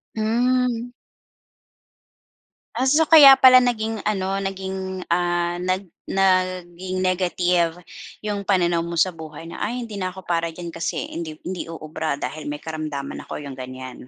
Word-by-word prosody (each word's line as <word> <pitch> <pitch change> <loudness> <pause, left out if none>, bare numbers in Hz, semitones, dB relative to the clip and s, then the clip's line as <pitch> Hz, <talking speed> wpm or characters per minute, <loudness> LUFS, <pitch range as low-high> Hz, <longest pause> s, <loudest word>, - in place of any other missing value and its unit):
Hmm. 245 +2 +1 1.8
Ah. 260 +3 +1
So, 305 +4 +5
kaya 295 -4 +9
pala 255 -1 +8
naging 225 -3 -1
ano 195 -1 -1
naging, 190 -1 -4
ah, 175 0 0
nag 185 0 -2 0.2
naging 185 -1 0
negative 180 -2 +1 0.5
'yung 205 -2 -3
pananaw 175 -3 +2
mo 170 0 -4
sa 180 +3 +3
buhay 160 -1 -10
na, - - -8
"Ay 245 +2 -2
hindi 210 -3 -7
na 185 - -1
ako 190 0 -11
para 170 -1 0
diyan 170 -1 -7
kasi 165 - -3
hindi 160 -2 -5
hindi 180 -2 -5
uubra 155 -2 -4
dahil 150 +1 -6
may 145 0 -5
karamdaman 155 -3 -5
ako," 150 - -6
'yung 135 -2 -8
ganiyan. 130 0 -8
185 Hz, 145 wpm, -22 LUFS, 165-205 Hz, 1.8 s, kaya